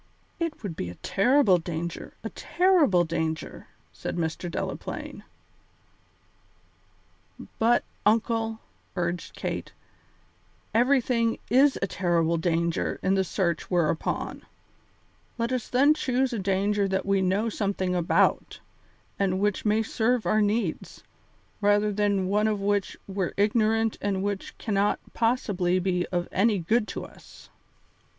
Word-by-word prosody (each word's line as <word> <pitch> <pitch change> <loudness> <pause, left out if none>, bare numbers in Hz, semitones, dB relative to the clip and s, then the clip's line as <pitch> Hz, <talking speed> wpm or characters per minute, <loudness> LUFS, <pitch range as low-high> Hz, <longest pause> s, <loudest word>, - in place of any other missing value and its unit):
"It 330 -7 -3
would 190 -6 -4
be 90 - -4
a 90 - -9
terrible 205 - +3
danger, 170 0 -5
a - - -5
terrible 340 - +3
danger," 160 -1 -3 0.3
said - - -5
Mr. 165 +1 -2
Delaplaine. - - -5 2.4
"But, 235 +2 +3 0.2
uncle," 225 +1 +1 0.3
urged 175 -1 -3
Kate, - - -4 1.0
"everything 240 -1 +2
is 270 +3 +5
a - - -1
terrible 170 -3 +1
danger 170 0 0
in 190 - +2
the 190 -1 +2
search 170 -3 -1
we're 175 -4 +2
upon; 160 - -3 1.0
let 235 +1 -1
us 255 -3 -2
then 275 +4 +4
choose 260 -3 0
a 230 - -2
danger 200 +1 +1
that 190 0 -1
we 195 -1 +2
know 190 +4 +1
something 195 -4 -1
about, 175 -2 +1 0.6
and 190 -1 +1
which 205 +1 0
may 215 +1 +3
serve 225 +2 0
our 215 - +3
needs, 205 -5 -1 0.6
rather 205 +1 +3
than 200 -2 +1
one 210 +3 +2
of 210 -2 0
which 200 0 -1
we're 190 -2 -3
ignorant 220 +1 +2
and 195 -1 -1
which 200 -1 -4
cannot 205 -1 +1 0.2
possibly 200 -7 +1
be 180 -1 0
of 175 -1 -2
any 210 +1 +2
good 210 +6 +1
to - - -5
us." - - -16
200 Hz, 130 wpm, -26 LUFS, 180-225 Hz, 2.4 s, is